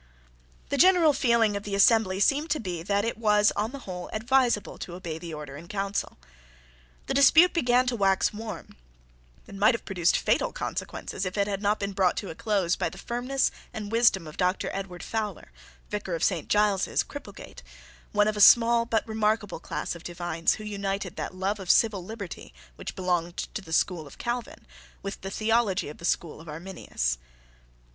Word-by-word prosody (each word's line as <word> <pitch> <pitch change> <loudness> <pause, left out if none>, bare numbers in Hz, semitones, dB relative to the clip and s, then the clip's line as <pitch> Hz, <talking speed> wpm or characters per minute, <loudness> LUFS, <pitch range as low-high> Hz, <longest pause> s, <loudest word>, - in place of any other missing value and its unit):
The 280 - -1
general 350 -4 +6
feeling 235 -6 +2
of 200 - -2
the 205 -1 -4
assembly 200 -2 +4
seemed 290 +9 +2
to 300 - +1
be 180 -6 -4
that 200 +4 0
it 230 -1 -3
was, 210 -2 +4
on 210 +2 -1
the 280 - -6
whole, 180 -2 -6
advisable 235 -1 +1
to 175 - -7
obey 170 -3 -6
the 170 0 -7
Order 150 -3 -7
in 165 +3 -11
Council. 200 +1 -3 0.9
The - - -2
dispute 315 +6 +6
began 250 -6 +3
to 250 -1 0
wax 195 -2 +2
warm, 220 +1 -8 0.7
and 195 - -10
might 215 +4 +5
have - - -8
produced 180 -4 +2
fatal - - +1
consequences, - - -4
if 185 +1 -3
it 200 - +3
had 200 -1 -3
not 210 +1 +1
been 200 0 -2
brought 190 -2 +1
to 200 - -4
a - - -6
close 195 -2 0
by - - -1
the - - -12
firmness 250 +3 -1 0.2
and 210 -1 -5
wisdom 225 -6 +3
of 155 0 -10
Doctor 180 +1 0
Edward 190 -3 -6
Fowler, 220 -2 -4 0.4
Vicar 205 -4 -3
of 165 - -3
St. 175 -6 +1
Giles's, 205 -2 +2
Cripplegate, 285 - -10 0.5
one 210 0 +3
of 215 - 0
a 210 - -1
small 235 +2 +7
but 225 -1 0
remarkable 215 -4 0
class - - -4
of 170 - -10
divines 175 -1 -1
who 215 - -9
united 200 -3 -3
that - - -4
love 195 +3 -1
of 190 -2 -8
civil 210 -5 +4
liberty 200 -2 -8 0.2
which - - -7
belonged 175 -2 -1
to - - -4
the 160 - -13
school 165 -2 +1
of - - -14
Calvin 245 +6 -4 0.4
with 195 0 -6
the 195 - -5
theology 215 -4 +1
of 150 - -11
the 170 - -7
school 160 -3 -1
of 160 - -12
Arminius. 150 - -3
200 Hz, 190 wpm, -27 LUFS, 180-225 Hz, 0.9 s, small